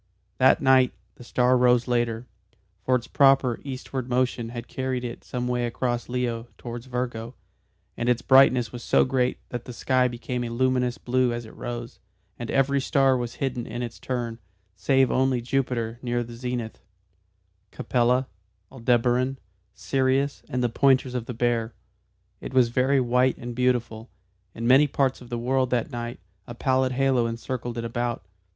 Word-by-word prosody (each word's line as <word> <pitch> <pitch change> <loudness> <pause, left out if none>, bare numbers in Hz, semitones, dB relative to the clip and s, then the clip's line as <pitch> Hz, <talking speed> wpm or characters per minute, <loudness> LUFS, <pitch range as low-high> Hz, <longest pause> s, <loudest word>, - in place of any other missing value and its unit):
That 130 +2 +5
night 130 -2 +5 0.2
the - - -14
star 125 +1 +2
rose 125 -1 +3
later, 120 -1 0 0.6
for 130 - +2
its 125 -1 -1
proper 135 -3 +4
eastward 130 -2 -5
motion 125 -2 0
had 120 0 -7
carried 130 -1 -3
it 120 -1 -6
some 125 -1 -4
way 125 -1 0
across 120 0 -2
Leo 120 -2 -2
towards 120 +1 -7
Virgo, 120 -1 -4 0.6
and 120 - -1
its 125 -1 +1
brightness 130 -4 +5
was 120 - -7
so - - +3
great 130 -1 0
that 120 -1 -5
the 125 - -8
sky 130 +2 +2
became 125 0 -4
a 120 - -4
luminous 125 0 0
blue 125 0 +1
as 120 0 -4
it 110 - -13
rose, 120 -1 -6 0.4
and 120 - -5
every 135 0 +2
star 135 -1 +3
was 120 -2 -3
hidden 125 -3 -3
in 120 +2 -4
its 120 -1 -7
turn, 120 -3 -4 0.4
save 130 +7 +2
only 130 -1 +2
Jupiter 120 -2 -2
near 120 -1 -1
the 120 0 -10
zenith, 120 -1 -5 0.9
Capella, 125 +1 +1 0.4
Aldebaran, 125 +1 +1 0.4
Sirius 135 +1 0
and 125 0 -1
the - - +3
pointers 130 +1 +3
of 125 -2 -3
the 125 - -5
Bear. 115 -1 0 0.6
It 130 - -8
was 125 -2 +5
very 130 +3 +2
white 125 +1 +2
and 120 0 -6
beautiful. 120 -2 -1 0.5
In 115 - -4
many 135 +5 +6
parts 135 -2 0
of 125 - -12
the 120 - -3
world 130 +2 0
that 125 -2 -1
night 120 -4 -5 0.3
a 120 - -8
pallid 130 0 +1
halo 130 -2 +2
encircled 120 +1 -4
it 115 - -3
about. 120 -3 -3
125 Hz, 165 wpm, -25 LUFS, 120-130 Hz, 0.9 s, many